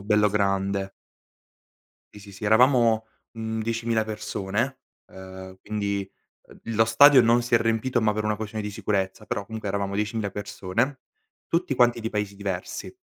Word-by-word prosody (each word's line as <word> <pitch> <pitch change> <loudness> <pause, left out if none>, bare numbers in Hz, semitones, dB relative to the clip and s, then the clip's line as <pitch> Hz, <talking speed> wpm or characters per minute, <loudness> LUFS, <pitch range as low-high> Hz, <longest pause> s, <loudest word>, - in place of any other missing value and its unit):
bello 105 +1 +3
grande. 100 -1 0 1.2
Sì, 105 - -11
sì, 100 0 -13
sì. 100 +2 -7
Eravamo, 115 -1 +4 0.3
mhmm, 110 0 -4
10.000 115 0 0
persone, 110 +4 -3 0.3
uhm, 95 0 -11
quindi, 100 -2 -3 0.4
uhm, - - -16 0.2
lo 110 +1 +4
stadio 130 +4 +7
non 120 +1 +4
si 120 0 +1
è - - +7
riempito, 115 +2 0
ma 105 -1 +2
per 110 0 -2
una 105 0 0
questione 110 0 -5
di 105 - -3
sicurezza, 100 -2 -2
però 100 - -3
comunque 110 -1 -6
eravamo 100 0 -2
10.000 105 0 -1
persone. 105 +6 -2 0.5
Tutti 170 -5 0
quanti 120 -1 +3
di 115 0 -3
paesi 105 -2 -3
diversi. 100 - -5
105 Hz, 155 wpm, -25 LUFS, 100-115 Hz, 1.2 s, stadio